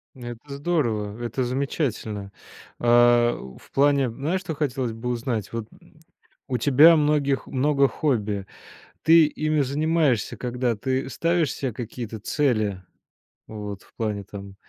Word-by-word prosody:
Ну, 120 -2 -9
это 140 +4 -9
здорово. 120 -9 -1
Это 120 +2 -2
замечательно. 120 -6 -2 0.5
А, 120 0 +5 0.2
в - - -19
плане, 140 -2 +3
знаешь, 155 +11 -2
что 165 -5 -5
хотелось 130 -5 -2
бы 120 +2 -5
узнать? 120 -3 -2
Вот, 115 -2 -4
м, 155 - -22 0.5
у 125 -2 -1
тебя 145 +7 +7
многих 145 -2 +1
много 140 +1 +2
хобби. 105 -11 -1 0.6
Ты 165 -1 +7
ими 155 0 -1
занимаешься 145 -3 +1
когда, 125 -2 -1
ты 130 +3 -2
ставишь 165 -1 +1
се 130 -4 -3
какие-то 115 -1 -6
цели? 110 -8 0 0.6
Вот 105 -3 -7
в - - -25
плане, 105 -3 -3
там, 100 0 -9
125 Hz, 135 wpm, -24 LUFS, 110-145 Hz, 0.6 s, тебя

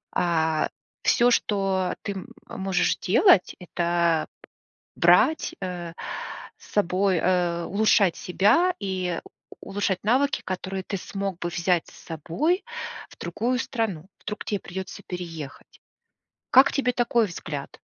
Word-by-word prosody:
А, 160 -3 +1 0.3
всё, 240 -1 +4
что 195 -4 +1
ты 200 - -3
м 190 -2 -7 0.2
э, - - -8
можешь 190 -1 +1
делат- 295 - +5
это 170 -2 +1 0.7
брать, 180 - +4
э, 175 -3 -5 0.6
с - - -17
собой, 190 -1 +2
э, 175 -1 +1
улучшать 200 -2 +3
себя 270 - +3
и 185 -3 -2 0.4
у - - -10
улучшать 195 -2 -1
навыки, 265 +6 +2
которые 190 +1 -4
ты 195 - -3
смог 195 -1 -4
бы - - -2
взять 175 0 +1
с - - -15
собой 225 - 0 0.5
в - - -17
другую 250 +2 -1
страну. 215 - -2 0.2
Вдруг 210 0 -5
тебе 205 - -1
придется 190 +1 -7
переехать. 165 -5 -7 0.7
Как 265 +2 +7
тебе 260 -3 +1
такой 240 -1 +2
взгляд? 150 -6 -6
190 Hz, 130 wpm, -25 LUFS, 175-210 Hz, 0.7 s, Как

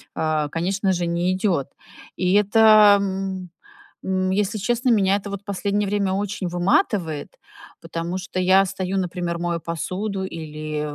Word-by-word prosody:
э, 155 -2 0
конечно 190 +4 0
же, 175 -1 -1
не 175 +2 0
идёт. 185 -8 0 0.5
И 185 0 +1
это, 210 0 +6
м, 190 -2 -3 0.6
м, 185 0 0
если 205 +2 0
честно, 240 +5 0
меня 200 -3 +3
это 200 0 -4
вот 200 0 -7
последнее 200 +1 -1
время 200 -1 0
очень 200 -1 -3
выматывает. 175 - 0 0.5
Потому 170 +2 -4
что 185 0 -7
я 190 +1 +4
стою, 190 0 -3
например, 175 -2 -2
мою 170 -1 -2
посуду 190 +5 -3
или 155 -3 -5
190 Hz, 140 wpm, -22 LUFS, 175-200 Hz, 0.6 s, это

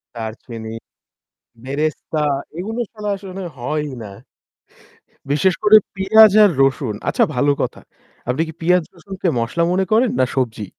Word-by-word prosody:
দারচিনি, 110 0 -7 0.9
বেরেস্তা 150 +3 -2 0.4
এগুলো 220 +6 -4
ছাড়া 210 -2 -5
আসলে 190 -1 -8
হয়ই 150 +3 -3
না। 100 - -9 1.2
বিশেষ 175 +5 +3
করে 215 +1 +8 0.2
পিঁয়াজ 215 +2 +6
আর 205 - +6
রসুন 135 -5 +1
আচ্ছা - - +2
ভালো 145 +3 +2
কথা। - - -4 0.5
আপনি 135 +6 0
কি 160 - -8
পেঁয়াজ, 180 +1 +3
রসুনকে 190 +1 -6
মসলা 120 +9 -1
মনে 190 +1 +1
করেন 230 +2 +4
না 130 - +4
সবজি? 115 -5 -2
160 Hz, 135 wpm, -19 LUFS, 130-195 Hz, 1.2 s, করে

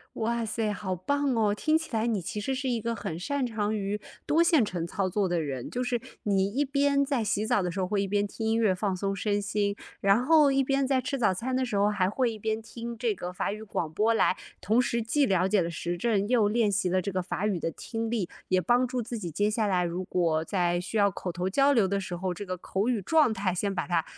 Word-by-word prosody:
哇 235 +1 -1
塞， 220 -1 -1
好 190 -3 -3
棒 285 +8 0
哦！ 210 -2 +2
听 310 +9 +2
起 320 - -8
来 225 0 +1
你 225 -4 0
其 195 +5 -4
实 265 +6 -2
是 265 0 -2
一 240 -2 0
个 230 +1 -2
很 200 -6 -4
擅 275 +8 -1
长 215 -2 -1
于 205 +1 -2 0.3
多 320 +3 +4
线 325 -7 +4
程 180 -5 -3
操 190 +2 -1
作 195 +1 0
的 175 -1 0
人， 135 -5 -4
就 250 +1 -2
是 245 -1 -1 0.2
你 195 -2 +2
一 280 +5 +1
边 280 0 +2
在 275 -4 0
洗 210 0 0
澡 235 -4 +2
的 180 - -1
时 180 - -6
候， 185 - +1
会 200 +1 0
一 195 - -2
边 205 +1 +1
听 220 +2 -6
音 225 - +2
乐 215 -5 +3
放 190 0 -1
松 195 +1 -1
身 205 +1 0
心， 205 0 -1 0.2
然 200 +5 +3
后 305 -1 +6
一 270 0 +2
边 275 0 +1
在 265 -1 +2
吃 275 +1 -3
早 220 -6 +3
餐 245 +7 -3
的 260 - +1
时 240 -5 -2
候， 200 +1 +3
还 195 -3 +1
会 245 +2 0
一 220 - -8
边 220 +1 -2
听 235 +1 -7
这 230 -2 0
个 180 -1 -6
法 180 - -2
语 215 +1 -7
广 170 -7 -3
播 215 +7 +2
来 205 - +3 0.3
同 220 +5 +3
时 235 -1 -1
既 280 +6 +2
了 185 -4 +2
解 200 +1 +3
了 170 -1 -1
时 170 +2 -3
政， 205 +1 +1
又 225 -3 +3
练 215 -1 +2
习 195 -1 +1
了 185 +1 +2
这 200 - -3
个 185 0 -1
法 190 +2 -2
语 195 -5 0
的 165 - -1
听 225 +5 -4
力， 215 -7 -1 0.2
也 185 0 +3
帮 245 +6 +3
助 250 0 -2
自 235 +1 -5
己 175 -5 -5
接 205 +7 +1
下 215 0 0
来 180 -3 +1
如 175 +2 -3
果 165 -3 +1
在 175 -2 0
需 180 - -5
要 200 -1 +4
口 185 0 -5
头 180 +2 -2
交 275 +7 +4
流 225 -6 +4
的 200 +1 -1
时 185 -2 -5
候， 185 +1 -2
这 205 - -6
个 185 0 -3
口 195 +4 -2
语 240 -4 +1
状 300 - +4
态 195 -4 -1
先 200 +2 -1
把 - - -2
它 170 -3 +1
210 Hz, 290 characters per minute, -28 LUFS, 185-235 Hz, 0.3 s, 后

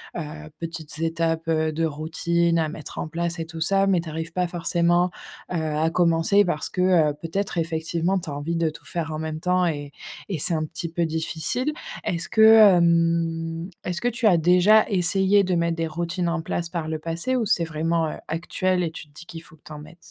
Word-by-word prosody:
heu, 175 - -3 0.4
petites 160 -3 -6
étapes, 165 0 -1
heu, 155 -1 +1
de 165 - -1
routine 170 +2 0
à 155 - 0
mettre 155 -1 -9
en 155 - -4
place 170 +1 -3
et 165 - -3
tout 165 0 -9
ça, 195 +4 +2
mais 190 -3 +3
tu 165 - -6
arrives 160 +1 -5
pas 180 +1 -1
forcément, 175 +1 +1 0.4
heu, 180 - -1
à 155 0 0
commencer 170 +4 +3
parce 155 -4 -2
que, 185 - -7 0.3
heu, - - -7
peut-être 195 +4 -3
effectivement 165 +3 -1
tu 165 - -7
as - - -4
envie 145 +4 -3
de 165 -1 +1
tout 155 - -13
faire 165 -3 -4
en 155 - -4
même 155 0 -4
temps 180 +1 +2
et 145 -3 -3 0.4
et 180 - -2
c'est 170 - +3
un 155 - 0
petit 160 +2 -5
peu 170 +1 -1
difficile. 160 - -2 0.3
Est-ce 170 -1 -2
que 220 - +2
hem 170 -5 +4
est-ce 180 -1 -3
que 240 - -1
tu 240 -1 +1
as 180 -5 +5
déjà 180 +6 +5
essayé 195 +1 +3
de 185 -1 0
mettre 170 0 0
des 165 -1 -2
routines 170 +2 -2
en 170 -1 -1
place 170 +1 -3
par 165 -2 -4
le 160 0 -3
passé 165 +10 -3
ou 240 -3 0
c'est 175 - +2
vraiment, 160 0 -1
heu, - - -7
actuel 180 +2 -1
et 165 - -2
tu 155 - -9
te - - -27
dis 160 +3 -11
qu'il 165 -1 -9
faut 160 - -16
que 150 - -30
tu - - -12
en 150 - -8
mettes? 155 +3 -13
170 Hz, 225 wpm, -24 LUFS, 160-180 Hz, 0.4 s, as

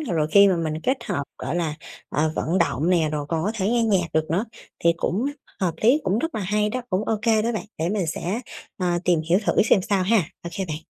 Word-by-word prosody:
rồi 170 - 0
khi 200 +2 +7
mà 185 - +2
mình 160 -2 -2
kết 260 +1 0
hợp, 190 -10 -2 0.2
gọi 140 - -3
là, 160 -3 -1 0.3
ờ, 155 +1 0
vận 170 +4 0
động 170 -1 +1
nè, 165 -4 +3
rồi 145 -1 -2
còn 160 0 -1
có 210 - 0
thể 195 -3 -1
nghe 235 +1 +2
nhạc 195 -6 +2
được 155 0 0
nữa, 185 +7 +1 0.4
thì 170 - +6
cũng 195 +7 -1 0.4
h - - -4
hợp 170 -3 0
lý, 250 +8 +4
cũng 190 +3 +1
rất 325 +6 -2
là 220 - -2
hay 210 +2 +1
đó, 250 +4 -3
cũng 190 +2 0
ô 220 - 0
kê 220 -2 +3
đó 235 +2 0
bạn, 220 - -3
để 165 - 0
mình 195 -2 -1
sẽ, 180 +7 -2 0.4
ờ, 175 -2 +1
tìm 175 -3 +3
hiểu 175 +2 +4
thử - - +3
xem 195 - +3
sao 200 -2 +1
ha, 220 +5 +3 0.3
ô 170 - -3
kê 195 - 0
bạn. 155 -4 -4
185 Hz, 265 wpm, -23 LUFS, 165-215 Hz, 0.4 s, khi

